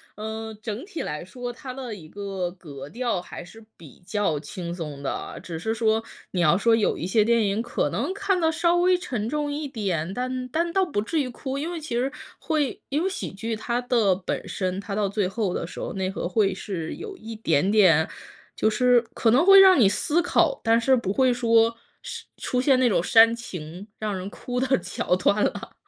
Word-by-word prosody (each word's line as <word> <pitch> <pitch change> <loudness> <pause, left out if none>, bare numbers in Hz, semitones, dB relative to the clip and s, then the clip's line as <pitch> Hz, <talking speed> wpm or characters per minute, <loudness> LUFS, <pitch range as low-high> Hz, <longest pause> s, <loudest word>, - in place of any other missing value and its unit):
呃， 220 +1 -5
整 220 +3 -4
体 365 -4 -6
来 150 +2 -4
说， 245 +6 -6
它 260 +1 -8
的 255 -3 -6
一 160 -6 -11
个 195 -2 -4
格 150 -6 -10
调 235 -2 -2
还 175 - -9
是 225 +4 -14
比 160 -5 -15
较 195 -7 0
轻 170 +3 -6
松 150 -5 -6
的 - - -1
啊， - - -6
只 165 -2 -7
是 220 +5 -2
说， 220 0 +1 0.3
你 180 - 0
要 170 +2 +4
说 225 +2 +4
有 215 - +1
一 - - -4
些 210 +3 +3
电 230 0 +3
影 200 +3 0
可 240 0 -1
能 - - -1
看 390 -2 0
得 320 0 +3
稍 340 +2 +2
微 360 +1 +4
沉 240 -11 -3
重 295 0 -2
一 295 0 -3
点， 185 - -2
但 255 +3 -3
但 335 +5 -1
倒 385 - +3
不 280 - -1
至 315 +6 0
于 255 - -3
哭。 265 +3 -5
因 325 +4 -3
为 340 - -4
其 300 -6 -5
实 255 +3 0 0.3
会 300 -5 -1
因 295 +5 0
为 380 - +1
喜 375 - -5
剧 225 +4 -4
它 235 +3 -2
的 235 -6 +2
本 185 0 -4
身， 185 0 -2
它 200 0 -5
到 210 -2 +1
最 200 -1 0
后 195 -1 -2
的 - - -3
时 - - -9
候， - - -4
内 190 -1 -2
核 190 - -3
会 195 +2 +2
是 180 -5 -5
有 415 -2 -8
一 225 -10 -8
点 185 -3 +1
点 180 -7 +5 0.5
就 220 - +2
是 245 +2 +4
可 225 - +2
能 270 +10 +4
会 390 0 +9
让 375 -6 +8
你 215 - +6
思 295 - +1
考， - - +2
但 230 0 +3
是 265 +2 +4
不 200 -5 -1
会 260 0 +3
说 230 -1 +3 0.3
是 - - -7
出 250 - -1
现 260 -1 +4
那 255 - +4
种 185 -6 +2
煽 230 +3 +6
情， 180 -4 -8
让 210 -3 -2
人 185 +2 -5
哭 245 +3 -4
的 265 -3 +2
桥 180 0 -1
段 200 +3 +2
了。 - - -3
225 Hz, 240 characters per minute, -25 LUFS, 190-260 Hz, 0.5 s, 会